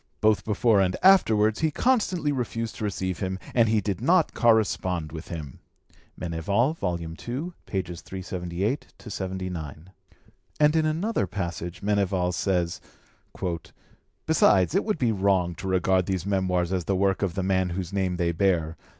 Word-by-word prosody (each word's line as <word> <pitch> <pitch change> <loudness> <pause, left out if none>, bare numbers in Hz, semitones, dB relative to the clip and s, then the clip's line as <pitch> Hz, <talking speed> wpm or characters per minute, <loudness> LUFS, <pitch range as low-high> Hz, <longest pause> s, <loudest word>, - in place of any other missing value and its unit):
Both 110 -1 +2
before 105 -1 +3
and 95 -1 +1
afterwards 110 - +5
he 160 - +2
constantly 185 - +1
refused 115 -4 -3
to - - -5
receive 95 -3 -2
him, 95 -1 -2 0.2
and 115 -3 +4
he 110 -1 +2
did 100 0 -3
not 170 +6 +3
correspond 95 - +2
with 80 +1 -8
him 75 -6 -7 0.6
"(Meneval, 90 - 0
ii. 85 - -3 0.4
378 90 - -4
79). 95 - -6 0.7
And 150 +1 +4
in 160 -1 +3
another 175 +9 0
passage 85 -2 -5
Meneval 100 -3 +1
says: 90 -3 -1 1.4
"Besides, 105 - +4
it 195 - +2
would 215 -3 -1
be 120 -6 +1
wrong 95 -4 +1
to 95 - -7
regard 95 0 +2
these 95 -2 -2
Memoirs 95 -2 0
as 90 -3 -1
the 95 - 0
work 95 0 +1
of 95 -4 -1
the 95 - -1
man 95 -1 +1
whose 90 +1 -4
name 95 -2 0
they 85 -1 0
bear. 85 -2 +1
95 Hz, 145 wpm, -26 LUFS, 90-110 Hz, 1.4 s, afterwards